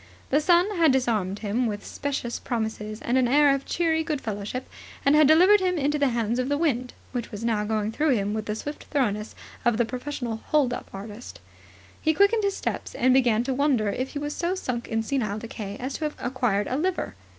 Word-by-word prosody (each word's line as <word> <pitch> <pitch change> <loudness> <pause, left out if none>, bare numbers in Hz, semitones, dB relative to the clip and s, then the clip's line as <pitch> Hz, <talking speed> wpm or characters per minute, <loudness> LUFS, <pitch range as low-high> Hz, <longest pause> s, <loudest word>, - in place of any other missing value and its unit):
The 290 +3 +4
sun 360 +5 +3
had 325 -4 +5
disarmed 220 -7 0
him 230 +4 +1
with 205 -2 -4
specious 275 -4 -3
promises 220 -2 -4
and 250 +2 +2
an 250 - +3
air 285 +2 +5
of 275 0 -3
cheery 320 -1 +1
goodfellowship, 250 -5 -4 0.4
and 280 - +5
had 305 -2 +6
delivered 365 +7 +7
him 365 -2 0
into 295 0 +1
the 285 - +3
hands 235 0 -1
of 255 +1 -1
the 285 - +1
wind, 255 -6 0 0.2
which 245 -2 -4
was 215 +1 -5
now 220 -3 +1
going 215 0 -1
through 295 +3 +2
him 205 -1 -1
with 215 -1 -3
the 210 - -1
swift 290 +7 -6
thoroughness 215 -7 -1 0.3
of 240 -3 +2
the 235 - +2
professional 250 -1 -4
hold 285 -6 +2
up - - -6
artist. 205 +4 -9 0.6
He 315 -1 +2
quickened 405 +4 +4
his 400 -1 0
steps, - - -4
and 255 +1 +3
began 240 -4 +3
to 265 +1 -1
wonder 255 -6 +2
if 255 +6 -3
he - - -4
was 295 0 -3
so 350 +2 -1
sunk 250 -10 -3
in 225 -1 -1
senile 220 -5 -1
decay 215 -2 -6
as 260 +2 -4
to 315 - -1
have 300 - -3
acquired 245 -5 0
a 255 - -2
liver. 360 +4 -1
255 Hz, 215 wpm, -25 LUFS, 220-295 Hz, 0.6 s, delivered